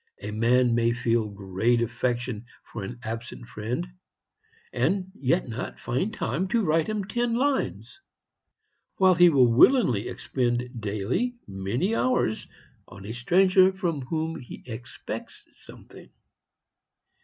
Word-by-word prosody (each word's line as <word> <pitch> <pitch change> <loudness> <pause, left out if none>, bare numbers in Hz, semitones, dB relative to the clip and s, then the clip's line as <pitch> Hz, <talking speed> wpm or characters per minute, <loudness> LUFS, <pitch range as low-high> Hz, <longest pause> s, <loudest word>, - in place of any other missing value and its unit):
A 105 - -4
man 120 +3 +3
may 115 0 +2
feel 115 -2 0
great 100 +4 0
affection 120 -1 -2 0.3
for 115 - -4
an 120 +5 -6
absent 115 +2 -6
friend, 115 +9 -4 0.9
and 190 -1 0
yet 130 -10 0
not 115 +1 -6
find 130 - -1
time 190 -3 -2
to 225 +3 +1
write 160 -2 +2
him 215 -2 -2
ten 240 +3 -1
lines, 280 +8 -1 0.9
while 190 -1 +5
he 175 0 +7
will 130 -6 +4
willingly 125 - +5
expend 125 -1 -2
daily 110 - -1
many 100 - -2
hours 230 - 0 0.4
on 95 +1 -12
a 110 - -5
stranger 185 +9 +4
from 175 -6 -2
whom 160 +5 -3
he 125 - -11
expects 120 -1 -7
something. - - -14
125 Hz, 125 wpm, -26 LUFS, 115-185 Hz, 0.9 s, he